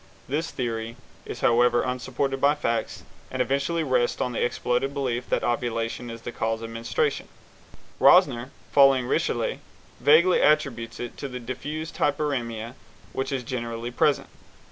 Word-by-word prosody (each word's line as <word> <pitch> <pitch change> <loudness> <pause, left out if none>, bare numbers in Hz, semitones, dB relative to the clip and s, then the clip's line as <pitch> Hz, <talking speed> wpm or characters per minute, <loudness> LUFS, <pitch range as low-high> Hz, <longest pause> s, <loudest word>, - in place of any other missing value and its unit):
This 155 +5 -1
theory 115 -2 -3 0.3
is, - - -6
however, 120 0 +4
unsupported 130 +1 -2
by 145 +1 +4
facts, 115 -6 -2 0.3
and 130 - -5
eventually 140 +6 0
rests 130 -4 +1
on 125 - -1
the 120 - -1
exploded 125 +3 -1
belief 125 -3 -2
that - - +1
ovulation 120 0 -2
is 115 0 -8
the - - -5
cause 115 0 -2
of 115 - -6
menstruation. 115 0 -1 0.7
Rosner, 120 +2 +5 0.2
following 135 -3 +5
Richelet, - - 0 0.4
vaguely 170 +5 +5
attributes 125 -7 +1
it 120 - -6
to 140 - -4
the 125 -1 -6
diffused 150 +7 -5
hyperæmia 120 -6 -1 0.4
which 135 +1 -2
is 135 -2 -2
generally 120 -1 -4
present. 145 +3 +1
125 Hz, 145 wpm, -25 LUFS, 115-140 Hz, 0.7 s, Rosner